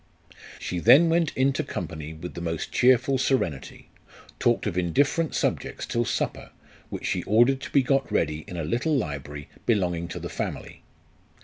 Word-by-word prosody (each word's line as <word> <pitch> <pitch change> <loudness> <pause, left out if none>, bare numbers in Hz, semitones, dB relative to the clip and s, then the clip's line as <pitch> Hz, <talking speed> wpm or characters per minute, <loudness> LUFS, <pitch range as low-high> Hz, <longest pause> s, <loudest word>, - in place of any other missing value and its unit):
She 90 - -4
then 135 - +7
went 165 -1 +2
into 135 +1 +2
company 80 -3 -6
with 80 +3 -8
the 85 - -7
most 85 -2 -3
cheerful 130 +1 +3
serenity, 85 - -2 0.5
talked 120 -1 +2
of 100 -5 -2
indifferent 140 - +1
subjects - - -2
till 120 0 -1
supper, - - -2 0.4
which - - -6
she - - 0
ordered 120 +6 +4
to - - -6
be 140 - +3
got 135 0 +1
ready 75 -1 0
in 90 - -7
a 80 - -2
little 125 - 0
library 75 - -5 0.2
belonging 90 -6 +1
to 85 - -6
the - - -5
family. - - -5
105 Hz, 165 wpm, -26 LUFS, 85-135 Hz, 0.5 s, then